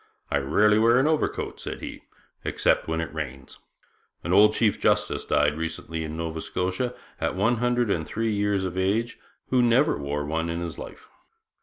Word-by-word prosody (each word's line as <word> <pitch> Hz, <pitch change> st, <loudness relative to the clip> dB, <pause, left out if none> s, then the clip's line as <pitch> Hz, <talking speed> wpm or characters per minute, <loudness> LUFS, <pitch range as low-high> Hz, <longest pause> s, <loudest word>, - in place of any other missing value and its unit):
'I 70 Hz, -, +2 dB
rarely 105 Hz, +10 st, +3 dB
wear 115 Hz, +2 st, +5 dB
an 130 Hz, -, +3 dB
overcoat,' 155 Hz, 0 st, -1 dB
said -, -, -5 dB
he, -, -, -8 dB, 0.4 s
'except -, -, +1 dB
when 80 Hz, 0 st, -1 dB
it 80 Hz, -3 st, -5 dB
rains; 70 Hz, -4 st, -6 dB, 0.6 s
an 85 Hz, -, -1 dB
old 105 Hz, +2 st, +6 dB
chief 110 Hz, -3 st, +2 dB
justice -, -, +1 dB
died 75 Hz, 0 st, +2 dB
recently 80 Hz, 0 st, -4 dB
in 80 Hz, 0 st, -5 dB
Nova 80 Hz, -1 st, -3 dB
Scotia 95 Hz, +10 st, -2 dB, 0.2 s
at -, -, -1 dB
one 115 Hz, +6 st, +2 dB
hundred 120 Hz, -2 st, +1 dB
and 80 Hz, -, 0 dB
three 115 Hz, 0 st, -1 dB
years 100 Hz, -1 st, 0 dB
of 90 Hz, -1 st, -3 dB
age, 105 Hz, +6 st, 0 dB, 0.3 s
who 130 Hz, -1 st, +4 dB
never 120 Hz, -, +3 dB
wore 75 Hz, +1 st, -3 dB
one 80 Hz, +2 st, -2 dB
in 85 Hz, 0 st, -2 dB
his 85 Hz, -3 st, -5 dB
life. -, -, -10 dB
95 Hz, 180 wpm, -25 LUFS, 80-115 Hz, 0.6 s, old